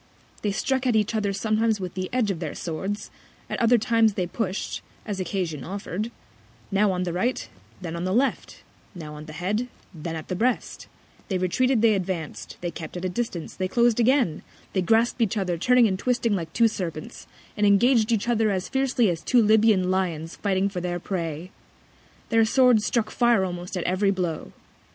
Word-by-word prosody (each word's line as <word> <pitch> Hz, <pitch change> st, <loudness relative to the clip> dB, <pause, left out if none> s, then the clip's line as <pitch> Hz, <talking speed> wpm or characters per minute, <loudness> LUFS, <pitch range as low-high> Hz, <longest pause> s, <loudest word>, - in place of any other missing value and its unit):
They 205 Hz, -, 0 dB
struck 260 Hz, +5 st, 0 dB
at 240 Hz, -, +2 dB
each 215 Hz, +1 st, +2 dB
other 210 Hz, -2 st, 0 dB
sometimes 215 Hz, +2 st, +1 dB
with 185 Hz, -2 st, -5 dB
the 185 Hz, 0 st, -4 dB
Edge 240 Hz, -5 st, +1 dB
of 175 Hz, -, -4 dB
their 160 Hz, -4 st, -4 dB
Swords, 190 Hz, +5 st, -4 dB, 0.4 s
at -, -, -2 dB
other 240 Hz, +1 st, +5 dB
Times 225 Hz, -2 st, +2 dB
they 180 Hz, -, 0 dB
push'd, 190 Hz, +1 st, -3 dB, 0.2 s
as 205 Hz, -3 st, -4 dB
Occasion 175 Hz, -6 st, -2 dB
offer'd: 200 Hz, -, -4 dB, 0.6 s
Now 200 Hz, +1 st, +3 dB
on 180 Hz, -1 st, -1 dB
the 175 Hz, -2 st, -2 dB
Right, 235 Hz, +9 st, -1 dB, 0.3 s
then 170 Hz, -2 st, -5 dB
on 170 Hz, -, -4 dB
the 185 Hz, -, -1 dB
Left; 255 Hz, +6 st, -1 dB, 0.3 s
now 155 Hz, -4 st, -7 dB
on 150 Hz, 0 st, -9 dB
the 155 Hz, -, -8 dB
Head, 200 Hz, +9 st, -1 dB, 0.3 s
then 165 Hz, 0 st, -5 dB
at 160 Hz, -, -7 dB
the 185 Hz, -, -2 dB
Breast; 240 Hz, +6 st, -1 dB, 0.4 s
they 190 Hz, -, 0 dB
retreated; 230 Hz, +7 st, +1 dB
they 225 Hz, -2 st, +6 dB
advanc'd; 180 Hz, -5 st, -4 dB
they 175 Hz, -1 st, -2 dB
kept 165 Hz, +1 st, -7 dB
at 175 Hz, -, -4 dB
a -, -, 0 dB
Distance; 180 Hz, -5 st, -4 dB
they 185 Hz, -, -1 dB
clos'd 235 Hz, +3 st, +3 dB
again; 240 Hz, -, +3 dB, 0.3 s
they 190 Hz, -, +1 dB
grasp'd 225 Hz, +6 st, +2 dB
each 220 Hz, -1 st, +1 dB
other, 185 Hz, -3 st, 0 dB
turning 245 Hz, +7 st, +4 dB
and 190 Hz, -2 st, -2 dB
twisting 240 Hz, -3 st, +1 dB
like 165 Hz, -4 st, -4 dB
two 230 Hz, +5 st, +4 dB
Serpents, 170 Hz, -7 st, -6 dB, 0.3 s
and 210 Hz, -1 st, +2 dB
engag'd 225 Hz, +3 st, +4 dB
each 225 Hz, -1 st, +1 dB
other 225 Hz, -2 st, +2 dB
as 190 Hz, -2 st, -2 dB
fiercely 265 Hz, -3 st, +2 dB
as 170 Hz, -3 st, -1 dB
two 250 Hz, -, +3 dB
Libyan 210 Hz, -3 st, +4 dB
Lions 170 Hz, -4 st, -1 dB
fighting 195 Hz, -1 st, +1 dB
for 190 Hz, -3 st, -4 dB
their 175 Hz, 0 st, -2 dB
Prey: 170 Hz, -1 st, -4 dB, 0.8 s
Their 225 Hz, -1 st, +4 dB
Swords 245 Hz, -1 st, +4 dB
struck 225 Hz, -3 st, 0 dB
Fire 240 Hz, -5 st, +3 dB
almost 180 Hz, 0 st, -5 dB
at 175 Hz, -, -2 dB
every 185 Hz, +3 st, +1 dB
Blow. 180 Hz, -5 st, -2 dB
195 Hz, 190 wpm, -25 LUFS, 180-230 Hz, 0.8 s, they